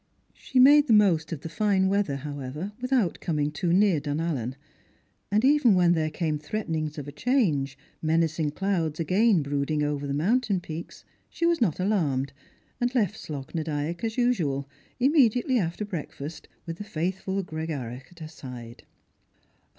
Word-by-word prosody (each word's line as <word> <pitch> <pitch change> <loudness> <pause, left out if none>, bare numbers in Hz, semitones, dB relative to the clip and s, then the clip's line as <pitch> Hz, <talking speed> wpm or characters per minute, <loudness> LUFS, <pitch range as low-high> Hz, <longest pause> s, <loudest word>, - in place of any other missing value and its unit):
She 265 - -5
made 290 +3 +7
the 230 - +4
most 185 -7 +4
of 155 -4 -4
the - - -6
fine 190 +2 +1
weather, 195 -7 +1
however, 145 +5 -5
without 255 -8 +1
coming 150 -3 -1
too 170 +3 -1
near 190 -3 +4
Dunallen; 145 -4 -2 0.8
and 215 +4 +3
even 270 -7 +5
when 175 -1 +4
there 155 -2 0
came 155 -1 -2
threaten 175 +3 -4
ings 155 -1 -2
of 145 -1 -6
a - - -6
change, 150 - +1 0.2
menacing 160 -1 +1
clouds 170 -5 -1
again 185 +2 +3
brooding 145 +2 -1
over 145 -1 -2
the 140 - -2
mountain 205 - +1
peaks, 165 -1 -8 0.2
she 335 - -2
was 335 -4 +2
not 185 -9 +1
alarmed, 145 -9 0 0.5
and 245 +1 0
left 215 -4 +2
Slogh 140 -7 -7
na 165 - -1
Dyack 155 +3 -3
as 225 +1 -2
usual, 165 - +1 0.3
immediately 255 -2 +3
after 175 +3 -2
breakfast, 160 -4 -7 0.2
with 165 0 -5
the - - -4
faithful 190 +2 -2
Gregarach 145 -7 -5
at 175 - -19
her 155 - -5
side. 125 -6 -10
165 Hz, 160 wpm, -26 LUFS, 150-210 Hz, 0.8 s, made